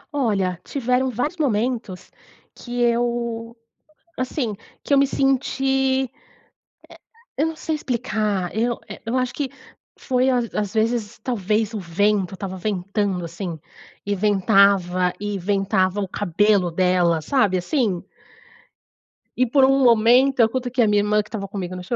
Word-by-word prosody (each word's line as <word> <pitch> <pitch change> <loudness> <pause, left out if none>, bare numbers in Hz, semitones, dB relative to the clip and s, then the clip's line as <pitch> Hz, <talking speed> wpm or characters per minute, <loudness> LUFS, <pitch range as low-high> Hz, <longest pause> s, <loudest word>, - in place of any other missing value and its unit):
Olha, 195 - 0
tiveram 255 -1 0
vários 275 +9 -2
momentos, 235 - -2 0.4
que 245 0 -7
eu, 235 -1 -1 0.6
assim, 255 -3 -2 0.3
que 285 - 0
eu - - +6
me 275 - +4
senti, 270 0 +1 1.3
eh, 295 - +2
eu - - +2
não 320 - -4
sei 315 0 -3
explicar, 215 - -2
eu 235 +1 0
eh, - - -8
eu 230 +3 -2
acho 255 -1 0
que 280 -3 -3 0.5
foi 255 0 +1
às 240 -2 0
às 205 -1 -2
vezes 220 -1 -1
talvez 215 -1 -1
o 210 - -2
vento 190 +2 0
tava 190 -1 -6
ventando, 195 -1 -2
assim, 170 -1 -6 0.4
e 205 0 -1
ventava, 195 -3 +3
e 205 -1 -2
ventava 195 0 0
o 195 - -2
cabelo 200 -1 +1
dela 175 -2 +2
sabe, 205 - +2
assim? 195 - -1 1.3
E 255 - +3
por 265 +2 +4
um 270 +1 +3
momento, 245 +3 +5
eu 225 -1 +6
cutuquei 250 -1 0
a - - +3
minha 205 0 +3
irmã, 210 0 +1
que - - -19
tava 200 -4 -5
comigo 185 -3 -5
no 180 - -7
show, 235 - -3
215 Hz, 150 wpm, -22 LUFS, 195-250 Hz, 1.3 s, eu